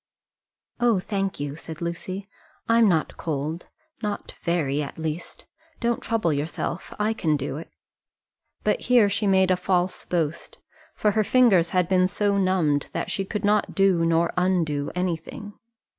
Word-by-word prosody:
"Oh, 240 -3 +3
thank 195 -1 -2
you," 145 0 -3
said 160 0 -9
Lucy; 185 +3 -4 0.4
"I'm 230 -2 +5
not 160 -4 0
cold, 155 +2 -3 0.3
not 210 -2 -4
very 150 -5 0
at 140 - -6
least. 160 +1 -5 0.3
Don't 235 -1 0
trouble 215 -9 0
yourself: 155 +4 -3
I 210 +1 +1
can 155 -8 +1
do 140 0 -4
it." 165 - -8 0.9
But - - +2
here 240 -5 +6
she 205 +2 -1
had - - +4
made 190 -1 +4
a - - +5
false 180 0 -1
boast, 165 -3 -2 0.4
for 210 - +2
her 215 +1 +2
fingers 205 -8 +4
had 180 -1 +1
been 185 0 +3
so 200 +1 0
numbed 175 -7 +1
that - - -3
she 195 - -1
could 205 +1 -3
not 210 0 +2
do 195 -4 +3
nor 165 0 +2
undo 170 -6 +1
anything. 180 +3 -3
180 Hz, 160 wpm, -25 LUFS, 160-205 Hz, 0.9 s, here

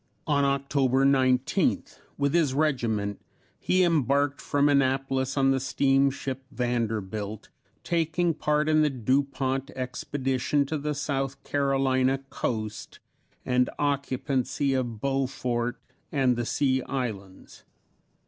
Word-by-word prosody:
On 145 -3 +2
October 140 -1 +2
19th, 130 -2 +1 0.2
with 140 -1 0
his 155 -6 +2
regiment, 115 -9 0 0.4
he 185 0 +2
embarked 145 -3 +1
from 145 0 +2
Annapolis 135 -1 +1
on 135 0 +4
the 135 - +1
steamship 135 0 +1
Vanderbilt, 110 -4 -3 0.3
taking 170 0 +1
part 150 0 0
in 155 0 +4
the 150 - +3
Dupont 135 +1 -1
Expedition 130 +2 -1
to 155 +2 -3
the 150 +1 -2
South 135 -2 -3
Carolina 135 -2 +1
coast 110 -2 -4 0.5
and 125 0 +2
occupancy 140 -1 -1
of 120 -4 -2
Beaufort 125 -2 -1 0.3
and 130 -4 +2
the 120 -1 -2
Sea 130 -2 +1
Islands. 105 -8 -5
135 Hz, 110 wpm, -27 LUFS, 125-140 Hz, 0.5 s, on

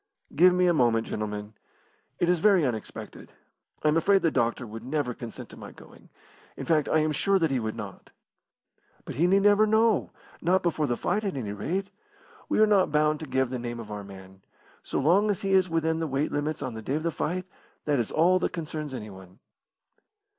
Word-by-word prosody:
"Give 180 +5 +7
me 180 0 +2
a 175 - +4
moment, 120 -6 +2
gentlemen. 105 0 -5 0.6
It 175 - +1
is 180 -1 +2
very 190 -3 +4
unexpected. 115 -4 -6 0.5
I - - +2
am 155 - +2
afraid 195 +4 +3
the 165 - +3
doctor 120 0 0
would 110 +1 -9
never 135 -1 -2
consent 115 -1 -9
to - - -12
my - - -9
going - - -17 0.5
in - - -5
fact, 155 -3 +2
I - - +3
am 155 0 +1
sure 195 +7 +2
that 165 -5 +1
he 130 - +1
would 110 -1 -3
not." 105 -4 -9 1.0
"But - - -6
he 170 +4 +2
need 195 +2 +3
never 205 +1 +5
know 220 0 +2 0.3
not 185 +2 +2
before 160 -3 0
the 120 -2 -1
fight, 215 - -1
at 195 -8 -3
any 105 -6 -4
rate. 180 - -3 0.6
We - - +1
are 215 - +7
not 200 -5 +3
bound 150 0 +2
to 155 - -7
give 130 -1 0
the 130 - -3
name 120 0 -5
of 110 -2 -8
our 105 -1 -5
man. 95 -1 -13 0.4
So - - -3
long 185 +9 +3
as 200 - -1
he 195 0 0
is 185 -1 +4
within 160 0 0
the 165 - -1
weight 140 +2 -1
limits 150 +1 -2
on 130 -3 -4
the 110 - -7
day 130 +6 -2
of 155 - -2
the 170 - 0
fight, 180 +4 -3 0.4
that 145 -3 +1
is 115 - -2
all 180 +4 +3
that - - -1
concerns 155 -4 -5
anyone." 95 -5 -10
150 Hz, 215 wpm, -27 LUFS, 120-180 Hz, 1.0 s, Give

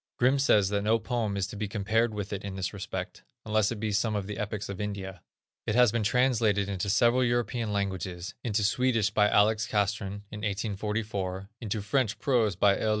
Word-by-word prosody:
Grimm 130 +3 +3
says 105 -8 +4
that 100 0 0
no 110 +3 +3
poem 115 -3 -2
is 100 - 0
to 95 - -8
be 105 0 -3
compared 110 +3 +1
with 105 -1 -5
it 100 - -4
in 100 -1 -5
this 95 +1 -3
respect, 100 -2 -5 0.2
unless 110 -1 +2
it 115 - -4
be 110 0 -1
some 105 +1 +1
of 100 -2 -2
the 105 0 -6
epics 105 0 -3
of 100 0 -5
India. 95 -3 -5 0.5
It 110 - 0
has 125 -3 +6
been 115 - 0
translated 110 -4 +2
into 100 0 -2
several 120 +5 +4
European 120 -2 0
languages; 95 -3 -3
into 110 -3 0
Swedish 115 0 +2
by 105 -1 +3
Alex. 110 +2 +3
Castrén, 100 -1 -1
in 105 - -7
1844; 100 -2 -3
into 105 -2 -3
French 120 -1 0
prose 115 -8 +1
by 100 +2 +3
L. 110 - 0
105 Hz, 200 wpm, -28 LUFS, 100-115 Hz, 0.5 s, has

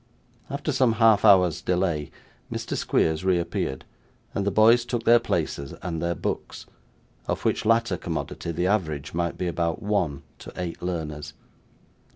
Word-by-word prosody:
After 145 +2 -2
some 130 -4 +3
half 110 -2 +4
hour's 90 -6 +5
delay, 90 -5 0 0.4
Mr. - - -3
Squeers 80 +1 +1
reappeared, 85 -7 -1 0.5
and 100 0 -1
the - - +5
boys 110 +4 +5
took 120 -1 -3
their 120 +1 +6
places 70 -10 -2
and 80 -3 -3
their 85 0 -1
books, - - -4 0.6
of - - -2
which - - 0
latter 115 +2 +2
commodity 85 0 -4
the 90 +2 -1
average 80 -8 -1
might 85 0 -1
be 90 - -2
about 85 -1 -1
one 90 -9 -1 0.2
to - - -10
eight 90 -2 -4
learners. 80 -4 -4
90 Hz, 150 wpm, -25 LUFS, 80-110 Hz, 0.6 s, their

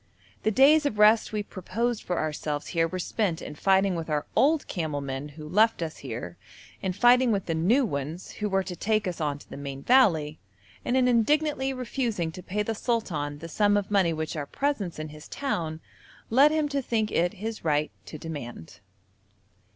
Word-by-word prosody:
The - - +2
days 290 +7 +5
of 215 - -4
rest 215 +1 +5
we 210 -1 -2
proposed 215 +5 -3
for 180 - -3
ourselves 150 -1 -3
here 165 -1 +1
were 185 - -5
spent 185 -1 -1
in - - -7
fighting 195 +4 +3
with 165 -2 -4
our 150 -1 0
old 300 +2 +3
camel 155 -5 -2
men 140 +1 -5
who 155 -1 -8
left 210 +2 +3
us 160 -1 -5
here, 115 -9 -7 0.4
in 190 - -1
fighting 245 +5 +5
with 200 -3 0
the 165 - -1
new 210 - +3
ones 150 0 -4
who 210 -1 -3
were 195 0 +1
to 185 -1 -6
take 215 +3 0
us 175 -2 -4
on 145 -2 -1
to - - -16
the - - -9
main 140 -1 -6
valley, 165 - +3 0.4
and 250 - +1
in 255 -1 +4
indignantly 270 +3 +2
refusing 240 -9 -2
to 180 - -9
pay 210 +3 -2
the 225 - -2
sultan 170 - -2
the 165 +3 -8
sum 205 +5 +2
of 205 0 -3
money 190 -4 +3
which 160 0 -3
our 145 -2 -4
presence 245 - -2
in 155 0 -5
his 150 0 -12
town 165 - -3 0.5
led 275 +6 +7
him 310 -1 +1
to 280 -1 -1
think 220 -4 -1
it 175 +1 +1
his 220 +3 -5
right 150 -1 +1 0.2
to 155 - -7
demand. 145 - -8
190 Hz, 195 wpm, -27 LUFS, 155-230 Hz, 0.5 s, led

